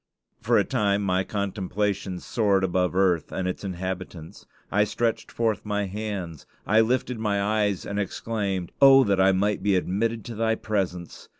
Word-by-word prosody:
For -, -, +3 dB
a -, -, +4 dB
time 105 Hz, -5 st, 0 dB
my 95 Hz, -1 st, +1 dB
contemplations 100 Hz, -1 st, -3 dB
soared 100 Hz, -4 st, +1 dB
above 90 Hz, -1 st, 0 dB
earth 90 Hz, -4 st, +2 dB
and 95 Hz, -1 st, -2 dB
its 90 Hz, -, -4 dB
inhabitants. 95 Hz, -3 st, -6 dB, 0.2 s
I 105 Hz, +1 st, +3 dB
stretched 115 Hz, +2 st, -2 dB
forth 115 Hz, -2 st, -1 dB
my 105 Hz, -1 st, -1 dB
hands; 95 Hz, -6 st, -5 dB, 0.2 s
I 110 Hz, +2 st, +4 dB
lifted 125 Hz, +1 st, 0 dB
my 105 Hz, -2 st, 0 dB
eyes, 105 Hz, -2 st, 0 dB
and 100 Hz, 0 st, -3 dB
exclaimed, 100 Hz, -2 st, -3 dB
"Oh, 135 Hz, -1 st, +8 dB
that 100 Hz, -4 st, +2 dB
I 95 Hz, 0 st, +5 dB
might 100 Hz, +2 st, 0 dB
be 100 Hz, 0 st, +2 dB
admitted 110 Hz, +5 st, -1 dB
to 120 Hz, -, -6 dB
thy 110 Hz, 0 st, 0 dB
presence! 95 Hz, -6 st, -4 dB
100 Hz, 165 wpm, -25 LUFS, 95-110 Hz, 0.2 s, Oh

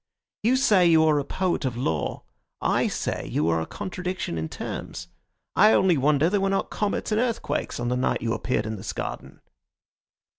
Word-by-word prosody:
You 235 Hz, +4 st, +3 dB
say 205 Hz, -9 st, +4 dB
you 160 Hz, -1 st, +5 dB
are 150 Hz, -2 st, +3 dB
a -, -, -1 dB
poet 180 Hz, +3 st, -1 dB
of 125 Hz, -3 st, -2 dB
law; 80 Hz, -, -2 dB, 0.4 s
I -, -, +1 dB
say -, -, -3 dB
you 75 Hz, -, +1 dB
are 80 Hz, 0 st, +1 dB
a 80 Hz, -, -4 dB
contradiction 185 Hz, -, -4 dB
in 80 Hz, -1 st, -3 dB
terms. -, -, -6 dB, 0.5 s
I 215 Hz, +3 st, +6 dB
only 185 Hz, -3 st, +4 dB
wonder 145 Hz, +2 st, +3 dB
there 200 Hz, +2 st, +1 dB
were 195 Hz, -, +1 dB
not 195 Hz, -, -1 dB
comets 210 Hz, +1 st, -2 dB
and 215 Hz, +2 st, +2 dB
earthquakes 235 Hz, -, -2 dB
on 120 Hz, 0 st, -1 dB
the 125 Hz, -, +1 dB
night 130 Hz, -, 0 dB
you 115 Hz, -1 st, 0 dB
appeared 115 Hz, -3 st, -1 dB
in 110 Hz, 0 st, -4 dB
this 100 Hz, +1 st, -5 dB
garden." -, -, -6 dB
160 Hz, 190 wpm, -25 LUFS, 120-195 Hz, 0.5 s, I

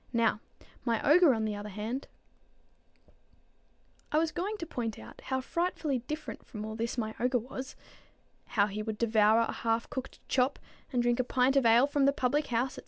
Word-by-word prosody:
Now 230 Hz, -2 st, +2 dB, 0.4 s
my 230 Hz, -2 st, +1 dB
ogre, 325 Hz, +1 st, +7 dB
on 220 Hz, -3 st, 0 dB
the 215 Hz, -, -1 dB
other 205 Hz, +1 st, -6 dB
hand" 220 Hz, +7 st, -4 dB, 2.0 s
I 300 Hz, -, +2 dB
was 320 Hz, 0 st, +2 dB
going 385 Hz, +5 st, -2 dB
on -, -, -5 dB
to 335 Hz, -, -5 dB
point 235 Hz, -8 st, -4 dB
out -, -, -12 dB
how 260 Hz, -1 st, -1 dB
frightfully 315 Hz, -3 st, -1 dB
different 300 Hz, +6 st, -6 dB
from 215 Hz, -1 st, -7 dB
all 220 Hz, 0 st, -5 dB
this 230 Hz, +3 st, -3 dB
my 220 Hz, -2 st, -2 dB
ogre 250 Hz, +1 st, +2 dB
was, 260 Hz, +3 st, -6 dB, 0.8 s
how 200 Hz, -, +6 dB
he 210 Hz, +1 st, -4 dB
would 215 Hz, 0 st, -4 dB
devour 220 Hz, -1 st, +4 dB
a 230 Hz, -, 0 dB
half 230 Hz, 0 st, -1 dB
cooked 260 Hz, 0 st, -6 dB
chop, 260 Hz, +1 st, +2 dB, 0.3 s
and 245 Hz, -2 st, +1 dB
drink 240 Hz, +1 st, +2 dB
a -, -, +3 dB
pint 255 Hz, +2 st, +2 dB
of 270 Hz, -4 st, +4 dB
ale 235 Hz, +3 st, +6 dB
from 285 Hz, -1 st, +1 dB
the 280 Hz, -, +4 dB
public 285 Hz, +3 st, 0 dB
house, 245 Hz, +2 st, 0 dB
&c. -, -, -9 dB
245 Hz, 195 wpm, -30 LUFS, 225-275 Hz, 2.0 s, ogre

